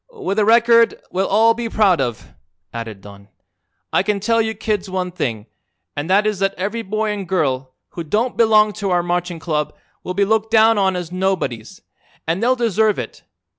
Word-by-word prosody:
"With 405 - -3
a 210 - +3
record 230 +1 +4
we'll 190 +1 0
all 225 +1 +4
be 230 0 -4
proud 200 -8 +3
of," 120 -4 -5 0.4
added 115 -4 -7
Don. 100 0 -14 0.7
"I - - +4
can 200 +1 -1
tell 230 +3 +1
you 220 0 -2
kids 210 -2 -2
one 185 -1 -3
thing, 115 -11 -3 0.5
and 145 +4 -4
that 200 +3 +3
is 210 -3 -1
that 195 0 0
every 205 +5 -3
boy 215 +1 -2
an' 205 -2 -4
girl 135 -8 -1
who 170 - -6
don't 220 +10 -1
belong 215 -2 +4
to 200 - -1
our 175 -1 +1
marching 175 0 -2
club 155 -2 -3 0.3
will 180 - -5
be 200 +1 +2
looked 220 +1 0
down 225 -1 +4
on 190 -1 +1
as 175 -2 -5
nobodies, 185 - -3 0.4
an' 165 +3 -1
they'll 245 +4 +2
deserve 220 -3 +1
it. - - -7
195 Hz, 190 wpm, -19 LUFS, 175-220 Hz, 0.7 s, record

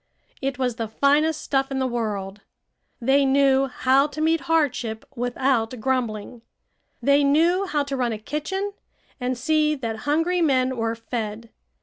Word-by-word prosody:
It 270 -1 -2
was 250 -3 -1
the 225 -2 -2
finest 290 +7 +2
stuff 270 -1 0
in 270 - -3
the 260 - 0
world. 210 -5 -3 0.6
They 270 +3 +3
knew 270 0 +3
how 265 +2 +2
to 300 - -9
meet 320 0 +2
hardship 245 -9 0
without 245 -1 0
grumbling. 235 -2 -2 0.6
They 280 +1 +4
knew 335 +7 +3
how 295 -4 0
to 280 -1 -4
run 250 -3 0
a 220 - -3
kitchen 310 - -3 0.5
and 250 0 -2
see 305 +3 +2
that 230 -5 -4
hungry 335 +4 +2
men 260 -4 +2
were 225 -1 -1
fed. 225 -1 -5
265 Hz, 150 wpm, -23 LUFS, 235-295 Hz, 0.6 s, They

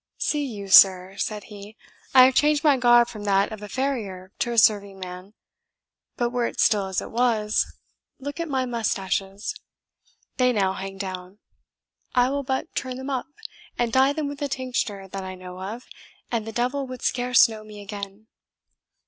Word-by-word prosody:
"See 295 -1 0
you, 210 -7 -6
sir!" 190 -1 +7
said 210 -1 -3
he, 210 +1 -12 0.4
"I 255 - +10
have 260 +1 +5
changed 300 +3 +3
my 295 -3 +5
garb 240 -2 +5
from 215 -3 -8
that 200 0 +2
of 215 -1 -7
a 210 - -8
farrier 205 -8 -3
to 240 - 0
a 235 - -3
serving 200 -2 +3
man; 185 +2 -9 0.8
but 240 -1 0
were 245 -1 0
it - - -8
still 205 -3 +3
as 190 -2 -2
it - - -9
was, 225 -3 +2 0.5
look 285 +3 -7
at 335 -1 -3
my 260 -2 0
moustaches. 200 - -2 0.8
They 250 -1 +3
now 195 -3 +1
hang 195 0 -7
down; 185 0 -6 0.8
I 250 +1 +4
will 280 0 -1
but 265 -1 -3
turn 255 -1 -3
them 265 +2 -5
up, 260 -2 -2 0.5
and 235 -1 0
dye 265 +1 +5
them 295 0 -2
with 285 0 -7
a 285 - 0
tincture 250 -7 -3
that 195 0 -6
I 185 0 -6
know 180 0 -10
of, 220 +6 -6 0.5
and 225 -2 -2
the - - -4
devil 250 +4 -1
would 255 -1 -8
scarce 250 -1 +4
know 220 -1 -8
me 210 -1 -11
again." 200 0 -8
220 Hz, 180 wpm, -24 LUFS, 195-255 Hz, 0.8 s, I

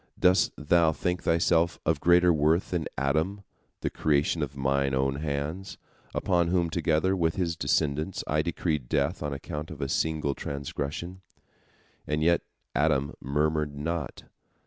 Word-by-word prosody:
Dost 90 0 +4
thou 80 +2 +3
think 90 +3 -2
thyself 85 0 +2
of 80 -2 +2
greater 85 +1 +5
worth 80 +4 +2
than 85 -3 -1
Adam, 80 +9 0 0.4
the - - -1
creation 75 +2 +1
of 70 -1 -4
Mine 70 0 +1
own 65 +1 +1
hands, 80 +5 -4 0.4
upon 85 -3 +2
whom 85 -2 +1
together 85 +3 +1
with 80 -3 +1
his 85 -4 -1
descendants 75 +3 0
I 75 +1 +1
decreed 75 -5 -2
death 75 +5 0
on 75 -1 -2
account 75 +2 -5
of 80 - -9
a 70 - -1
single 75 0 0
transgression? 75 +6 -5 0.9
And 75 +1 0
yet 85 +1 +4 0.3
Adam 75 -2 +1
murmured 75 +1 0
not. 80 0 -4
80 Hz, 145 wpm, -28 LUFS, 70-85 Hz, 0.9 s, greater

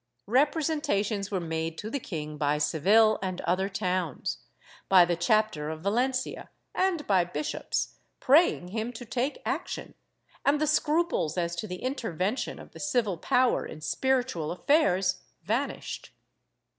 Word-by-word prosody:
Repre 290 +8 +3
sentations 210 -10 0
were 195 - -1
made 160 -1 -3
to 210 - -5
the 275 +6 -2
king 155 -9 -5
by 150 0 +1
Seville 195 +9 +4
and 185 -2 -3
other 185 +3 0
towns, 180 -6 -2 0.5
by 185 -2 +8
the 175 0 0
chapter 175 -4 +1
of 155 0 -5
Valencia, 255 +7 -1 0.2
and 365 -5 +1
by 190 -3 +4
bishops, 150 -4 -3 0.2
praying 275 - +4
him 220 +4 -3
to 245 +1 -8
take 260 - -2
action, - - -3 0.5
and 285 +1 +3
the 305 - +2
scruples 305 - +1
as 170 -1 -1
to 215 - -3
the 180 -1 -7
intervention 225 - -2
of - - -12
the - - -12
civil 230 - 0
power 255 +6 +2
in 155 - -8
spiritual 245 - 0
affairs 185 - +2 0.2
vanished. 230 - -3
200 Hz, 145 wpm, -28 LUFS, 175-255 Hz, 0.5 s, by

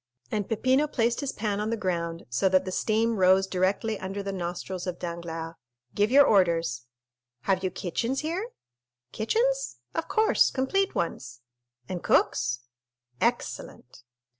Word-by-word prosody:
And 210 -3 -2
Peppino 260 +6 +2
placed 235 -4 0
his 280 -2 -2
pan 205 -1 -2
on 210 +1 -1
the 230 - -1
ground, 170 -4 -2
so 125 +11 +1
that 185 0 +3
the 185 - -3
steam 225 +3 +1
rose 190 +1 +5
directly 195 +3 0
under 195 +2 -4
the 195 0 -3
nostrils 180 +1 -4
of 180 -1 -3
Danglars. 170 -1 -5 0.4
"Give 205 +1 +2
your 280 +3 +7
orders." 165 - +2 0.5
"Have 190 +4 +1
you 185 - +1
kitchens 230 +9 -2
here?" 350 +9 -3 0.6
"Kitchens?—of - - -1
course—complete 390 - +2
ones." 125 -8 -3 0.5
"And 180 -2 -4
cooks?" 125 0 +2 0.6
"Excellent!" 125 - -2
195 Hz, 135 wpm, -27 LUFS, 175-230 Hz, 0.6 s, your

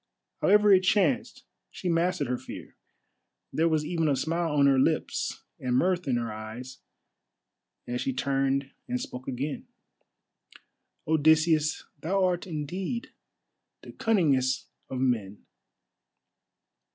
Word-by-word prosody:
However 210 0 +6
it 190 - +7
chanced, 200 +6 +1 0.3
she 185 - -6
mastered 175 +1 +1
her 125 +1 -1
fear; - - -10 0.8
there 165 +1 +2
was 155 -1 +1
even 165 0 0
a 145 - +3
smile 165 +4 -1
on 145 -1 +4
her 135 -1 +5
lips - - 0 0.2
and 125 -1 -1
mirth 180 +3 +1
in 130 - +2
her 115 -2 -3
eyes 110 +4 -8 1.1
as 125 0 -2
she 135 - 0
turned 135 +1 0 0.2
and 250 0 -1
spoke 125 - -7
again. 135 +3 -4 1.4
"Odysseus, 160 0 +3 0.2
thou 190 +4 +1
art 180 0 -1
indeed 180 - -4 0.7
the - - -10
cunningest 140 - +1 0.2
of 130 - -4
men. 110 -6 -1
150 Hz, 120 wpm, -28 LUFS, 130-175 Hz, 1.4 s, it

